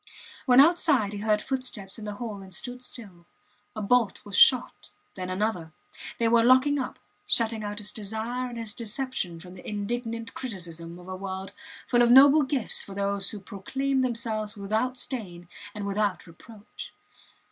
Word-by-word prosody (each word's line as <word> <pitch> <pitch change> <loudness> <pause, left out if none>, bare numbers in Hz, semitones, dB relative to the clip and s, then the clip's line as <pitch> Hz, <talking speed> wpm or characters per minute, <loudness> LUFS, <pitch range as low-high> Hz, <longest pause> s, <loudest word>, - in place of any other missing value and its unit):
When 250 0 +7
outside 285 - +4
he 205 - -4
heard 210 0 +1
footsteps 245 -7 -4
in 215 - -7
the 210 -1 -5
hall 210 -3 -6
and 190 -1 -12
stood 245 +6 -7
still. 195 -9 -10 0.5
A 215 - -4
bolt 230 -1 +2
was 200 -2 -6
shot 250 +5 +5 0.2
then 185 -1 -5
another. 185 -4 -2 0.4
They 230 - +2
were 230 0 +5
locking 260 +4 +5
up 255 - -4 0.3
shutting 225 -2 +1
out 205 0 -4
his 210 0 -4
desire 220 +4 -4
and 240 - -8
his 225 -3 -2
deception 230 -7 -3
from 180 +2 -11
the 185 - -9
indignant 230 +2 -4
criticism 170 -8 -5
of 180 0 -13
a 185 - -5
world 190 0 -5 0.3
full 240 -1 +3
of 240 - +5
noble 280 +4 +8
gifts 265 -4 -1
for 195 - -9
those 200 0 0
who 210 - -6
proclaim 265 +8 -2
themselves 225 -4 -1
without 220 +6 -1
stain 185 -10 -6 0.3
and 205 -1 -4
without 200 -1 -1
reproach. 205 +5 -12
215 Hz, 170 wpm, -27 LUFS, 195-245 Hz, 0.5 s, noble